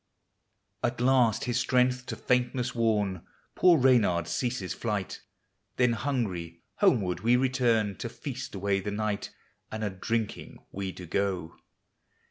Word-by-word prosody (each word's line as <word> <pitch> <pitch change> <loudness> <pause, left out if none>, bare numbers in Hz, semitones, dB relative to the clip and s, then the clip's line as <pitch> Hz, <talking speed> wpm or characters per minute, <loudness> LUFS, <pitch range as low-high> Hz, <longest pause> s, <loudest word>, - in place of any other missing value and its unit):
At 120 0 -1
last 125 -3 +3
his 120 0 0
strength 125 0 +1
to - - -4
faintnesg 125 0 0
worn, 105 -6 0 0.3
Poor 175 -2 +5
Reynard 110 - +3
ceases 120 -6 -2
flight; 105 -5 -3 0.5
Then 125 -2 +3
hungry, 100 - -3
homeward 110 - +2
we 115 +5 +3
return, 120 -5 +2
To - - -4
feast - - -6
away 100 0 0
the 95 - -4
night, 105 0 -2 0.4
And 110 0 -4
a 105 - -1
drinking 110 +3 -3
we 95 -1 -4
do 90 0 -10
go. 90 -2 -2
110 Hz, 130 wpm, -28 LUFS, 95-125 Hz, 0.5 s, Poor